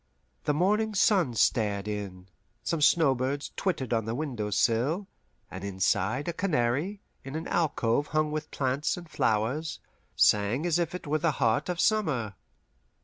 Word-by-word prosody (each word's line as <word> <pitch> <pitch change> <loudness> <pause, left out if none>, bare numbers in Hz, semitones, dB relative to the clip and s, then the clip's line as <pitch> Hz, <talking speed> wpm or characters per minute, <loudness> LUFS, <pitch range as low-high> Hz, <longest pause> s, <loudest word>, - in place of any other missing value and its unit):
The 150 - +2
morning 210 +6 +1
sun 185 - +3
stared 105 -3 +1
in, 100 -3 -5 0.4
some 165 -2 -1
snowbirds 140 -2 +2
twittered 140 - -1
on 115 -2 0
the 115 +1 -2
window 125 -8 -3
sill, 125 - +1 0.5
and 95 0 -7
inside, 100 - 0
a 170 - -1
canary, 160 - 0 0.2
in 135 +2 -7
an 160 +1 -4
alcove 145 -5 +1
hung 155 0 0
with 155 0 -4
plants 135 +4 -1
and 175 -1 -9
flowers, 130 +5 -1 0.4
sang 105 +9 +3
as 175 -1 +2
if 170 0 -1
it 180 - -7
were 155 +1 0
the 155 0 +1
heart 115 +2 +1
of 175 -1 -2
summer. 150 - +1
140 Hz, 150 wpm, -28 LUFS, 115-165 Hz, 0.5 s, sun